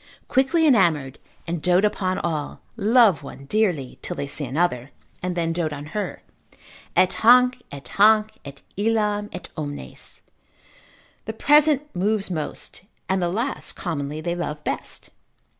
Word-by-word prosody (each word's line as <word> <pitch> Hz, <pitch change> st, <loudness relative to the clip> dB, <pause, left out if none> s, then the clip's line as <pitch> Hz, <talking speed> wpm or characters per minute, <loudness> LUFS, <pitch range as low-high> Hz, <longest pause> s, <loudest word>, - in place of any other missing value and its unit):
quickly 295 Hz, +6 st, +2 dB
enamoured, 165 Hz, -, +3 dB, 0.3 s
and 170 Hz, -1 st, -3 dB
dote 180 Hz, +4 st, +3 dB
upon 185 Hz, -3 st, 0 dB
all, 155 Hz, -4 st, -3 dB, 0.2 s
love 220 Hz, -, +4 dB
one 140 Hz, -1 st, -10 dB
dearly, 175 Hz, -, 0 dB
till -, -, -4 dB
they -, -, -3 dB
see 145 Hz, +1 st, -2 dB
another, 135 Hz, -2 st, -1 dB, 0.3 s
and 180 Hz, -1 st, -3 dB
then 165 Hz, -1 st, 0 dB
dote 165 Hz, -2 st, -1 dB
on 145 Hz, 0 st, -6 dB
her, 210 Hz, -, -4 dB, 0.7 s
Et 185 Hz, -, +4 dB
hanc, 250 Hz, +2 st, +6 dB
et 140 Hz, -1 st, -9 dB
hanc, 215 Hz, +1 st, +4 dB
et 140 Hz, 0 st, -11 dB
illam, 210 Hz, -1 st, 0 dB
et -, -, -8 dB
omnes, 145 Hz, -, -7 dB, 1.0 s
the 220 Hz, -, -4 dB
present 295 Hz, +3 st, +4 dB
moves 200 Hz, +1 st, 0 dB
most, 155 Hz, -4 st, -5 dB, 0.3 s
and 190 Hz, 0 st, 0 dB
the 175 Hz, -, +1 dB
last 235 Hz, +9 st, -2 dB
commonly 150 Hz, -3 st, -4 dB
they 170 Hz, +2 st, -2 dB
love 150 Hz, -4 st, -4 dB
best. -, -, -4 dB
180 Hz, 140 wpm, -23 LUFS, 150-220 Hz, 1.0 s, hanc